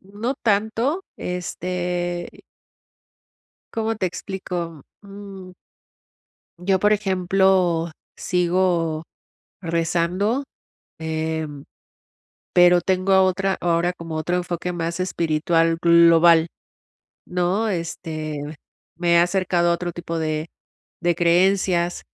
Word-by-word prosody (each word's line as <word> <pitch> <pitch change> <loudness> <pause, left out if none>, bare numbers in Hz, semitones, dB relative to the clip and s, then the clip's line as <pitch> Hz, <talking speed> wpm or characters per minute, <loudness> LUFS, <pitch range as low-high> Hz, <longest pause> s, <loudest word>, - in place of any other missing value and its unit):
no 210 +7 -4
tanto 225 - 0
este 180 0 -4 1.3
¿cómo 225 0 -1
te 190 - 0
explico? 175 -4 -5 0.2
Mm 195 -2 -10 1.1
Yo, 190 +1 +1
por 210 +2 +3
ejemplo, 185 -4 +2 0.3
sigo 175 -3 0 0.6
rezando, 175 +8 0 0.6
em, 160 -2 -3 0.9
pero 175 0 +6
tengo 190 +1 +2
otra 190 +1 0
ahora 175 +1 +1
como 165 -2 -7
otro 155 +3 -1
enfoque 180 0 -3
más 170 +1 -3
espiritual 165 -1 +1
global, 170 -1 +6 0.8
¿no?, 180 +5 0
este, 160 -4 -4 0.6
me 170 0 +2
he - - +6
acercado 175 -1 +2
a - - +4
otro 175 0 -4
tipo 170 -1 -5
de 155 0 -2 0.5
de 175 -1 +2
creencias 175 0 +2
175 Hz, 90 wpm, -22 LUFS, 170-190 Hz, 1.3 s, pero